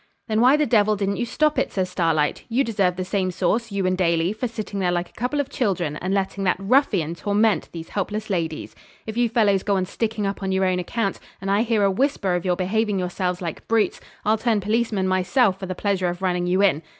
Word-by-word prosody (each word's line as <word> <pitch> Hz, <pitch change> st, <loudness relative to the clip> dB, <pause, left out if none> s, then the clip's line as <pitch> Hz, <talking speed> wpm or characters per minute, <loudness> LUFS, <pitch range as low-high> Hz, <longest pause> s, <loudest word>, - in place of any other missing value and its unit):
'Then 220 Hz, 0 st, +1 dB
why 260 Hz, +4 st, +6 dB
the 300 Hz, -, +2 dB
devil 215 Hz, -4 st, +3 dB
didn't 200 Hz, 0 st, -1 dB
you 240 Hz, -, -2 dB
stop 305 Hz, +4 st, +1 dB
it?' -, -, -1 dB
says 190 Hz, -2 st, -1 dB
Starlight. 165 Hz, -5 st, 0 dB
'You 245 Hz, +4 st, +2 dB
deserve 200 Hz, -7 st, +1 dB
the 185 Hz, 0 st, -3 dB
same 190 Hz, -1 st, 0 dB
sauce, 225 Hz, +5 st, -1 dB
you 200 Hz, -1 st, -1 dB
and 185 Hz, 0 st, +2 dB
Daly, 170 Hz, 0 st, +1 dB
for 220 Hz, +4 st, -3 dB
sitting 215 Hz, -3 st, -5 dB
there 180 Hz, -2 st, +1 dB
like 175 Hz, 0 st, -1 dB
a -, -, -26 dB
couple 250 Hz, +5 st, -2 dB
of 285 Hz, -, 0 dB
children, 190 Hz, -, -1 dB
and 185 Hz, +4 st, -3 dB
letting 195 Hz, 0 st, -1 dB
that 185 Hz, -, +2 dB
ruffian 195 Hz, -, +2 dB
torment 205 Hz, +4 st, +1 dB
these 165 Hz, -1 st, -8 dB
helpless 210 Hz, +2 st, -3 dB
ladies. 165 Hz, -5 st, -3 dB, 0.3 s
If 220 Hz, -, -6 dB
you 240 Hz, -1 st, +2 dB
fellows 210 Hz, -4 st, +3 dB
go 200 Hz, 0 st, 0 dB
on 185 Hz, -1 st, 0 dB
sticking 215 Hz, +2 st, -2 dB
up 195 Hz, 0 st, -3 dB
on 190 Hz, -1 st, -2 dB
your 190 Hz, 0 st, +2 dB
own 185 Hz, -1 st, +1 dB
account, 195 Hz, +2 st, -2 dB, 0.2 s
and 195 Hz, +1 st, -2 dB
I 200 Hz, +2 st, +3 dB
hear 225 Hz, -3 st, +1 dB
a 195 Hz, -, +3 dB
whisper 200 Hz, -4 st, 0 dB
of 175 Hz, 0 st, -1 dB
your 180 Hz, -1 st, +2 dB
behaving 205 Hz, +3 st, 0 dB
yourselves 180 Hz, 0 st, -2 dB
like 165 Hz, -2 st, -6 dB
brutes, 225 Hz, -2 st, +1 dB, 0.2 s
I'll 215 Hz, +1 st, +2 dB
turn 225 Hz, -2 st, +1 dB
policeman 210 Hz, -1 st, 0 dB
myself 185 Hz, +2 st, +2 dB
for 190 Hz, -, -5 dB
the 185 Hz, -, -4 dB
pleasure 190 Hz, -1 st, 0 dB
of 175 Hz, +2 st, -6 dB
running 180 Hz, -1 st, 0 dB
you 185 Hz, +3 st, +2 dB
in. 170 Hz, -6 st, +3 dB
195 Hz, 235 wpm, -23 LUFS, 185-220 Hz, 0.3 s, why